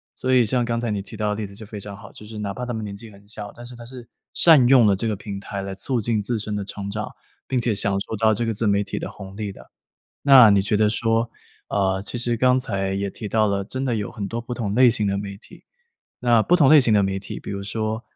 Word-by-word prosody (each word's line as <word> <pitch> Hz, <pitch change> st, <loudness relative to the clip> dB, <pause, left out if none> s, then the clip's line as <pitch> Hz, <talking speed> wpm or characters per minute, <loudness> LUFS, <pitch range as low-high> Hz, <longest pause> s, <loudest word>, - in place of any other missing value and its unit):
所 130 Hz, 0 st, -1 dB
以 125 Hz, -2 st, +5 dB
像 120 Hz, +2 st, 0 dB
刚 115 Hz, 0 st, -1 dB
才 120 Hz, -1 st, -2 dB
你 105 Hz, -2 st, -2 dB
提 110 Hz, -, -11 dB
到 105 Hz, -1 st, -1 dB
的 105 Hz, -, -1 dB
例 110 Hz, 0 st, -4 dB
子 100 Hz, 0 st, -12 dB
就 110 Hz, -, -8 dB
非 105 Hz, 0 st, -7 dB
常 100 Hz, 0 st, -8 dB
好， 100 Hz, 0 st, -13 dB
就 105 Hz, -, -13 dB
是 105 Hz, 0 st, -8 dB
哪 100 Hz, -1 st, -3 dB
怕 125 Hz, -, -5 dB
他 125 Hz, -, -4 dB
们 110 Hz, -1 st, -4 dB
年 100 Hz, -1 st, -6 dB
纪 110 Hz, +1 st, -11 dB
很 100 Hz, 0 st, -18 dB
小， 105 Hz, -1 st, -7 dB
但 120 Hz, -, -11 dB
是 120 Hz, 0 st, -10 dB
他 120 Hz, 0 st, -11 dB
是 120 Hz, -1 st, -11 dB, 0.2 s
善 155 Hz, -8 st, +6 dB
用 125 Hz, -2 st, +6 dB
了 100 Hz, -, +4 dB
这 105 Hz, +4 st, -2 dB
个 110 Hz, -, -1 dB
平 100 Hz, 0 st, -7 dB
台 100 Hz, 0 st, -6 dB
来 95 Hz, 0 st, -5 dB
促 120 Hz, +5 st, -1 dB
进 110 Hz, 0 st, 0 dB
自 110 Hz, +2 st, -2 dB
身 105 Hz, 0 st, -3 dB
的 100 Hz, -, -3 dB
成 100 Hz, 0 st, -5 dB
长， 105 Hz, +1 st, -4 dB, 0.4 s
并 130 Hz, -2 st, 0 dB
且 120 Hz, -2 st, +1 dB
享 100 Hz, 0 st, +3 dB
受 110 Hz, -, -5 dB
到 110 Hz, +1 st, +3 dB
这 110 Hz, +3 st, -1 dB
个 115 Hz, -, -1 dB
自 110 Hz, +2 st, -2 dB
媒 100 Hz, 0 st, +2 dB
体 100 Hz, -, -5 dB
的 -, -, -5 dB
红 95 Hz, 0 st, -11 dB
利 105 Hz, -2 st, -4 dB
的。 -, -, -15 dB, 0.5 s
那 135 Hz, -5 st, +8 dB
你 100 Hz, -1 st, +4 dB
觉 105 Hz, -, -1 dB
得 105 Hz, 0 st, +3 dB
说， 115 Hz, +1 st, 0 dB, 0.4 s
呃， 95 Hz, -1 st, 0 dB
其 105 Hz, -, -3 dB
实 120 Hz, 0 st, +3 dB
刚 125 Hz, +2 st, +3 dB
才 95 Hz, -6 st, -2 dB
也 100 Hz, 0 st, -2 dB
提 105 Hz, -, -7 dB
到 110 Hz, +1 st, +2 dB
了， 100 Hz, 0 st, -1 dB
真 130 Hz, +6 st, -4 dB
的 120 Hz, -4 st, 0 dB
有 105 Hz, -2 st, -4 dB
很 100 Hz, -, -5 dB
多 115 Hz, +3 st, -4 dB
不 120 Hz, +1 st, -6 dB
同 105 Hz, -4 st, -3 dB
类 125 Hz, 0 st, +7 dB
型 110 Hz, -3 st, -1 dB
的 100 Hz, 0 st, -1 dB
媒 100 Hz, -1 st, -6 dB
体。 105 Hz, -, -16 dB, 0.6 s
那 120 Hz, -2 st, +4 dB
不 180 Hz, +10 st, +3 dB
同 145 Hz, -5 st, +5 dB
类 155 Hz, -2 st, +8 dB
型 115 Hz, -4 st, +3 dB
的 100 Hz, -, +4 dB
媒 95 Hz, 0 st, -1 dB
体， 95 Hz, -, -7 dB
比 -, -, -9 dB
如 100 Hz, 0 st, -4 dB
说， 110 Hz, +2 st, -3 dB
110 Hz, 315 characters per minute, -22 LUFS, 100-120 Hz, 0.6 s, 那